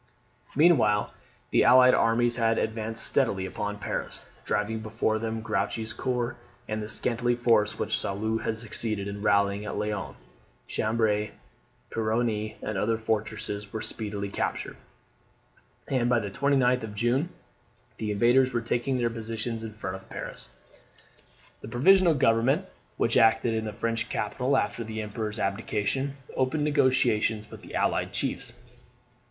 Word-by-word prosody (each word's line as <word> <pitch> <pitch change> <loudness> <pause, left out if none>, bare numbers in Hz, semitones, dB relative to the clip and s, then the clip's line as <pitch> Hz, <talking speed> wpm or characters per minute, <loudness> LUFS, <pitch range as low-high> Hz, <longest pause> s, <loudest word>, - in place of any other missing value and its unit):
Meanwhile 140 -10 +4 0.4
the - - +4
allied 125 0 +7
armies 120 +1 +3
had 115 -1 +2
advanced 110 0 -1
steadily 100 -9 +1
upon 105 +2 -4
Paris, - - -4 0.2
driving 105 +2 0
before 110 0 -1
them 110 0 -3
Grouchy's 110 0 -2
corps, 125 -1 -2 0.3
and 110 0 -2
the 105 - -6
scanty 120 +1 0
force 115 -3 +2
which - - +1
Soult 110 +3 -1
had 110 - -2
succeeded 110 -2 -2
in 100 0 -5
rallying 100 -1 +2
at 105 - -4
Laon. 105 -1 -3 0.5
Cambray, 110 -1 +1 0.6
Peronne, 110 -1 -1
and 110 -3 -2
other 110 +3 +1
fortresses 105 -2 -3
were 110 - -4
speedily 100 -2 -2
captured; - - -3 1.1
and 125 -3 +1
by 120 - +4
the 100 -3 -2
29th 130 -1 +2
of 110 -2 -7
June 120 - +1 0.7
the 110 - -3
invaders 120 +5 +4
were 120 - +1
taking 120 +3 0
their 120 -1 0
positions 115 0 -4
in 110 - -5
front 100 -3 -5
of 95 - -17
Paris. - - -6 1.1
The - - -8
Provisional 170 - +5
Government, 130 +7 +2 0.3
which 115 - +2
acted 115 +1 +4
in 110 0 -1
the 110 - -3
French 115 +2 -2
capital 125 +5 0
after 120 - -1
the 110 -1 -4
Emperor's 105 0 -4
abdication, 105 +8 -1 0.2
opened 130 +4 +1
negotiations 115 -7 +2
with - - -10
the - - -9
allied - - +1
chiefs. - - -3
110 Hz, 140 wpm, -27 LUFS, 105-120 Hz, 1.1 s, allied